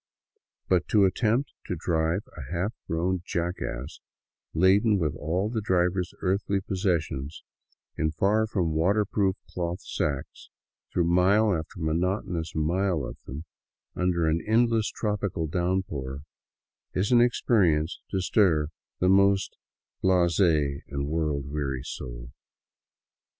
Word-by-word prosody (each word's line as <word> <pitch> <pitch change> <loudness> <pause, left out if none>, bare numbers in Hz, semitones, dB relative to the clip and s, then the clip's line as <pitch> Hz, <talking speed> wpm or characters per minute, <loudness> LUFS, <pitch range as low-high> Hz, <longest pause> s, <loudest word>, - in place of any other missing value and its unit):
But 90 -5 +2
to 105 -3 +4
attempt 115 +7 +1
to 90 - -2
drive 85 +3 0
a 70 -5 -8
half 90 +6 -1
grown 90 +2 0
jackass, 80 -8 -4 0.5
laden 100 +5 +4
with 80 -6 0
all 90 +7 -1
the 110 0 -2
driver's 90 -2 0
earthly 100 +1 0
possessions 85 -7 -2 0.5
in 80 - +1
far 100 +7 +2
from 90 -7 0
water 100 +7 +2
proof 95 -2 +1 0.2
cloth 85 0 -2
sacks, 70 -2 -4 0.4
through 85 - +1
mile 95 +4 +4
after 80 +4 -6
monotonous 85 +1 -1
mile 85 -1 +1
of - - -7
them, 75 +6 -7 0.5
under 90 -2 +1
an 80 +1 +1
endless 115 -1 +3
tropical 100 -6 -2
downpour, 80 -6 -2 0.7
is 100 +6 +1
an 120 -1 +6
experience 95 -10 +2
to 95 - -1
stir 85 -6 +3 0.3
the 90 - +1
most 100 +1 +4 0.5
blaze 90 -2 +3
and 70 -5 +1
world 75 -3 -1
weary 70 -3 -3
soul. - - -7
90 Hz, 120 wpm, -27 LUFS, 80-100 Hz, 0.7 s, an